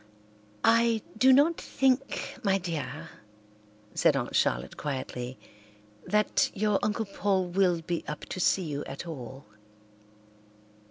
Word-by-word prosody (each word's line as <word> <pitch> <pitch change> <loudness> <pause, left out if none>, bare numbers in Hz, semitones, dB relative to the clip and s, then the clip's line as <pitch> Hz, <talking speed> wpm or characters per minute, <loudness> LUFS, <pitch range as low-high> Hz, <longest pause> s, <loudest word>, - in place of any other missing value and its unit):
"I 230 -1 +4
do 255 +4 +5
not 290 +5 +4
think, 270 0 0
my 195 -2 +2
dear," 165 -3 -5 0.9
said - - +3
Aunt - - -3
Charlotte 60 +2 +1
quietly, 130 -3 -4 0.7
"that 210 0 +2
your 210 0 +2
Uncle 215 +1 0
Paul 195 -1 0
will 175 -2 +2
be 170 0 -2
up 150 - -5
to - - -5
see 185 +1 +2
you 145 -3 -4
at 135 +5 -7
all." 135 -4 -8
185 Hz, 120 wpm, -28 LUFS, 150-215 Hz, 0.9 s, do